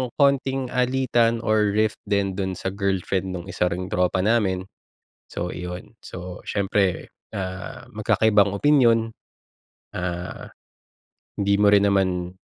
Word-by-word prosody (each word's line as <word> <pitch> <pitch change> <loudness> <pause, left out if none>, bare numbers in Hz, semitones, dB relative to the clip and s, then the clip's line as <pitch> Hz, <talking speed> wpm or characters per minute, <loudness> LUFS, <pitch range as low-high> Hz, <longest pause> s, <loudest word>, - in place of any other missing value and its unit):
konting 135 -2 +1
alitan 125 -2 +2
or 105 -2 +2
rift 110 +1 +1
din 100 -1 +1
do'n 95 -1 -2
sa 95 - -3
girlfriend 95 -1 -1
nung 90 -1 -6
isa 90 0 0
ring 90 +1 -3
tropa 90 +1 +1
namin, 100 -4 +1 0.7
so, 90 - -3
iyon. 90 +4 -7
So, 90 0 -8
siyempre, 100 -2 0 0.3
ah, 95 -1 -6
magkakaibang 105 -2 +3
opinyon, 115 -2 +4 0.9
ah, 90 -1 -4 0.9
hindi 100 0 +2
mo 105 - +5
rin 100 0 +5
naman, 95 -3 +1
100 Hz, 120 wpm, -23 LUFS, 90-115 Hz, 0.9 s, mo